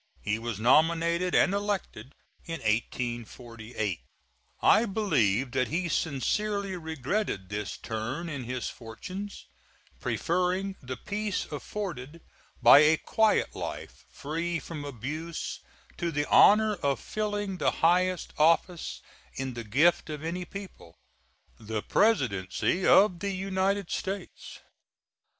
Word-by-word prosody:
He 105 +2 -1
was 115 -3 -4
nominated 170 +7 +3
and 190 - +4
elected 200 - -3 0.3
in 165 - -5
1848. 115 -2 -3 0.6
I 220 +2 +6
believe 135 - +1
that 130 -1 +1
he 175 +3 -1
sincerely 195 +7 -1
regretted 160 - -3
this 105 0 -4
turn 120 +10 -4
in 140 -6 -5
his 125 0 -3
fortunes, 185 - -8 0.5
preferring 185 +3 0
the 130 -2 -6
peace 210 - -3
afforded 165 -2 -6 0.4
by - - +10
a 155 +1 +5
quiet 220 +5 +1
life - - -6
free 165 +4 -3
from 160 -2 -7
abuse 150 +6 -5 0.4
to 170 - -1
the 145 -2 -1
honor 215 0 +6
of 140 -4 0
filling 205 -3 -3
the - - +3 0.2
highest 180 +1 +2
office 165 +2 +2 0.3
in 135 -1 -3
the 120 0 -6
gift 145 +11 +3
of 150 0 -5
any 175 +2 -3
people, 185 - -10 0.6
the 110 -1 -4
Presidency 135 - +1
of 190 -3 +6
the 200 - -2
United 195 0 -1
States. 195 +1 -5
165 Hz, 115 wpm, -28 LUFS, 125-190 Hz, 0.6 s, by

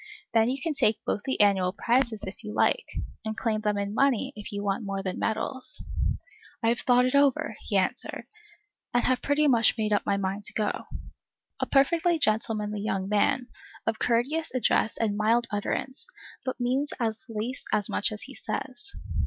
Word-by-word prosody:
Then 225 0 +4
you 265 +2 -1
can 325 +1 -1
take 220 -6 +3
both - - 0
the 265 - -1
annual 190 -3 +4
prizes, 235 -1 +1
if 195 +4 -7
you 210 -1 -6
like, 470 - +2 0.3
and 220 0 -4
claim 215 -2 0
them 210 -1 0
in 200 0 -2
money, 270 +1 +2
if 210 - -8
you 205 0 -3
want 200 +2 0
that - - -7
more 195 0 -2
than 185 -1 -3
medals. 250 - -2 0.8
I 225 - +4
have 235 - +1
thought 250 0 +4
it 255 - 0
all 280 0 +7
over, 255 -4 -1
he 200 - -1
answered, 195 +6 -1 0.7
and 245 - +4
have 255 -1 +2
pretty 295 +1 +2
much 235 -4 +4
made 215 -1 +1
up 205 - +2
my 200 - +1
mind 200 +1 -2
to - - -1
go. 210 -1 -1 0.7
A - - -1
perfectly 330 +5 +3
gentlemanly 215 -4 0
young 195 -2 -1
man, 210 +4 +2 0.4
of 225 -1 -1
courteous 275 +8 +1
address 230 -3 +2
and 215 -3 0
mild 230 +3 +3
utterance, 260 - -2 0.4
but 260 -1 -3
means 260 +4 0
at 225 -2 +1 0.2
least 225 +4 -4
as 205 - +1
much - - 0
as 215 - -4
he 270 - -9
says. 260 +7 -5
225 Hz, 190 wpm, -27 LUFS, 210-260 Hz, 0.8 s, all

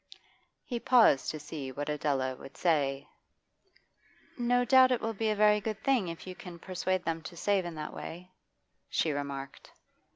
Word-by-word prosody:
He 240 -3 -3
paused 230 - +5
to 155 - -4
see 150 -2 -6
what 145 +3 -5
Adela 140 -3 -1
would 135 - -13
say. 140 -5 +1 1.3
'No 245 0 +2
doubt 260 +1 +6
it 250 - +2
will 225 0 -2
be 220 +1 -1
a 215 - +1
very 210 0 +4
good 215 0 -4
thing 260 -9 +2
if 165 -1 -7
you 185 - -6
can 180 -1 -10
persuade 185 +1 -2
them 165 0 -1
to 170 +2 -9
save 195 0 +1
in 170 -1 -5
that 150 -1 -6
way,' 180 +3 -8 0.6
she 160 - +1
remarked. 140 -1 -6
175 Hz, 170 wpm, -30 LUFS, 145-215 Hz, 1.3 s, doubt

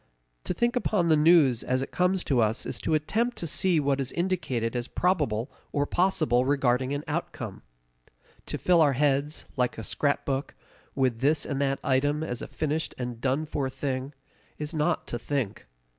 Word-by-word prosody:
To - - -1
think 240 +1 +1
upon 210 -8 +1
the 160 - +6
news 150 -6 +5
as 130 +1 0
it - - -8
comes 180 +1 +1
to 130 -4 +2
us 110 +2 0
is - - -3
to 160 - +1
attempt 225 +10 0
to 170 - -3
see 170 +1 +2
what 140 -1 +1
is 130 - -2
indicated 165 -11 -1
as 120 0 -2
probable 130 - 0 0.2
or 145 0 +1
possible 155 -8 +2
regarding 130 -1 +1
an 145 +1 -2
outcome. - - -4 0.9
To - - -3
fill 175 -2 +4
our 145 -3 +4
heads, 145 +2 +1
like 125 -1 0
a 110 - -5
scrapbook, 140 +3 -1 0.4
with 130 -4 +1
this 145 +3 +2
and 140 -1 -2
that 135 -1 +1
item 145 +3 +1
as 125 -6 -4
a - - -5
finished 155 +1 -2
and 125 -2 -5
done 135 +4 0
for 140 -3 -2
thing, 135 +1 -4 0.4
is 150 +2 -4
not 160 +2 0
to 120 - -4
think. 130 -4 -3
145 Hz, 180 wpm, -27 LUFS, 130-160 Hz, 0.9 s, the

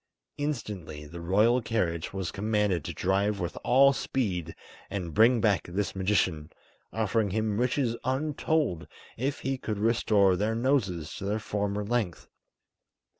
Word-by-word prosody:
Instantly 100 - -4
the 85 +3 -9
royal 105 +8 +3
carriage 90 -8 -1
was 95 -3 -3
commanded 105 -5 0
to - - -4
drive 100 +2 0
with 85 -3 -3
all 135 +3 +6
speed 100 - -2 0.3
and 90 -5 -4
bring 115 +3 +5
back 105 -4 +2
this 95 +2 -2
magician, 95 -5 0 0.4
offering 110 -1 0
him 110 +1 -1
riches 125 -1 +1
untold 140 - 0 0.3
if 135 +4 -2
he 135 -1 -2
could 110 -4 -3
restore 105 -3 +3
their 105 +4 0
noses 105 - 0
to - - -6
their 105 +2 0
former 105 -1 -2
length. 110 -6 -2
105 Hz, 135 wpm, -28 LUFS, 95-120 Hz, 0.4 s, all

